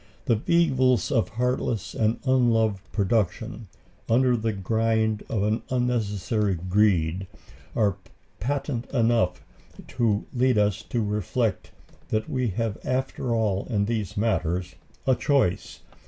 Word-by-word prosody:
The 110 -2 +1
evils 135 -7 +3
of 115 -6 +2
heartless 120 -2 -1
and 110 0 +1
unloving 115 -6 +3
production, 110 +2 -1 0.4
under 125 +2 +4
the 115 -1 -1
grind 110 +2 0
of 105 -3 0
an 105 +2 +1
unnecessary 105 -5 0
greed, 90 -1 +1 0.5
are 100 -4 +2 0.4
patent 130 - -2
enough 115 -7 +1 0.5
to 110 -4 0
lead 125 -2 +2
us 105 0 +2
to 120 -2 0
reflect 105 +1 -1 0.4
that 110 0 -1
we 130 -2 -1
have 110 +1 -2
after 130 -2 -1
all 105 -4 0
in 100 -4 +1
these 110 -3 -3
matters 90 -4 0 0.3
a 130 - +4
choice. 135 - 0
110 Hz, 120 wpm, -25 LUFS, 100-125 Hz, 0.5 s, under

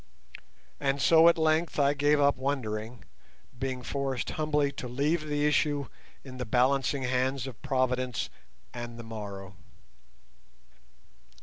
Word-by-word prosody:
And 140 -1 0
so 165 +3 +6
at 170 - +2
length 160 +1 +1
I 140 -1 +4
gave 145 +1 +3
up 140 0 +4
wondering, 120 -4 -3 0.5
being 130 -1 -3
forced 135 -3 -2
humbly 150 -2 0
to 135 -2 -6
leave 150 +6 0
the 145 0 0
issue 145 -2 +1 0.3
in 130 -2 -10
the - - -1
balancing 135 +3 +2
hands 130 +1 0
of 130 -5 -9
Providence 130 -2 -1 0.4
and 120 -1 -7
the 115 - -8
morrow. 100 -4 -7
135 Hz, 125 wpm, -29 LUFS, 125-145 Hz, 0.5 s, so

